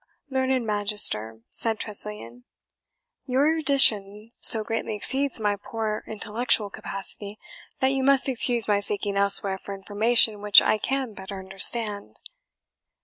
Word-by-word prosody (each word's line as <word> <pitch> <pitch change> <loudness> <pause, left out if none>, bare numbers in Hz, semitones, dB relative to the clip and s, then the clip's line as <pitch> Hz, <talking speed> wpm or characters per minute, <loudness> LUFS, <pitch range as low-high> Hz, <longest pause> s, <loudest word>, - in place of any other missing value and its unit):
"Learned 260 -2 -2
Magister," 205 - -1
said 225 -1 -1
Tressilian, 205 - -5 0.8
"your 260 +2 0
erudition 230 -9 +1
so 220 -1 +8
greatly 225 -1 -5
exceeds 270 +5 0
my 205 -1 -2
poor 215 +1 -6
intellectual 215 0 -2
capacity 200 +2 -6 0.4
that 265 0 +1
you 270 0 -3
must 275 0 +3
excuse 240 -2 -1
my 205 -1 0
seeking 205 0 -4
elsewhere 200 -1 +1
for 200 - -9
information 210 +2 +1
which 205 -1 +6
I 215 - -1
can 265 -1 -4
better 195 0 -9
understand." 195 - +3
210 Hz, 125 wpm, -23 LUFS, 200-240 Hz, 0.8 s, so